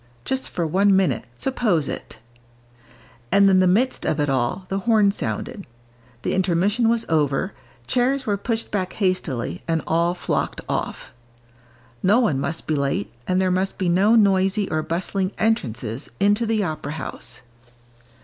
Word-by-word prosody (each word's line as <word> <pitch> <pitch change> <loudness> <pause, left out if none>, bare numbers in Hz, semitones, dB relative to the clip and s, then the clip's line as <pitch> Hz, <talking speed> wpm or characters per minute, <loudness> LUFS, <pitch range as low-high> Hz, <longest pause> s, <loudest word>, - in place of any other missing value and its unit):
Just 265 0 -2
for 170 - -2
one 195 +5 +3
minute, 180 -11 +1
suppose 205 - 0
it! - - -6 1.1
And 200 0 +6
in 190 -1 +5
the 185 - +4
midst 235 +8 +2
of 155 - 0
it 145 -1 +1
all, 135 +9 -1
the 195 +1 -2
horn 210 -1 +3
sounded; 200 0 -4 0.6
the - - 0
intermission 190 +5 +2
was 230 0 +1
over, 155 +4 +1 0.3
chairs 260 - +1
were 205 - +1
pushed 225 +3 -3
back 185 -3 -2
hastily, 160 - -1
and 165 -1 0
all 170 +2 +1
flocked - - -2
off. - - -3 0.9
No 205 +6 +4
one 175 - +1
must 160 +4 -3
be 155 - 0
late, 140 -7 -1
and 185 0 +2
there 185 -1 +2
must 185 +1 0
be 185 -3 0
no 195 +6 +4
noisy 195 -1 +3
or 155 - +1
bustling 185 +4 -2
entrances 130 - -1
into 205 +3 +2
the 220 -2 +1
opera 155 -4 -4
house. 125 -5 -6
185 Hz, 155 wpm, -23 LUFS, 160-210 Hz, 1.1 s, And